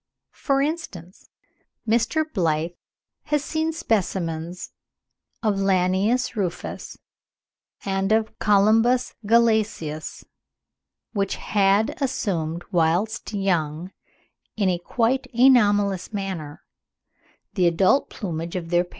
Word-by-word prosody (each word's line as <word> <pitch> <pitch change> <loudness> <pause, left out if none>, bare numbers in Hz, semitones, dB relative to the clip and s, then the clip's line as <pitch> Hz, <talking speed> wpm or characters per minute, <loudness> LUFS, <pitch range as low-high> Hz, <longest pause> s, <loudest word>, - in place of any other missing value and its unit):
For 275 -1 0
instance 200 - -6 0.6
Mr. 235 +8 +2
Blyth 170 - -1 0.5
has 295 -1 0
seen 320 +1 -1
specimens 180 - -2 0.7
of 210 -3 +1
Lanius 195 +6 +1
rufus 185 -5 -4 0.9
and 195 0 -1
of 220 0 0
Colymbus 225 +5 +3
glacialis 220 -9 +1 0.9
which 200 -3 -1
had 200 +3 +1
assumed 175 - -2
whilst 175 +7 0
young, 175 -4 -1 0.7
in 200 -3 +2
a 175 -1 0
quite 240 +8 0
anomalous 205 -7 +4
manner, 190 -8 -5 0.9
the 185 -4 +3
adult 185 +10 +3
plumage 170 -4 -5
of 170 -2 -5
their 175 0 +3
parents. - - -23
195 Hz, 95 wpm, -23 LUFS, 175-225 Hz, 0.9 s, anomalous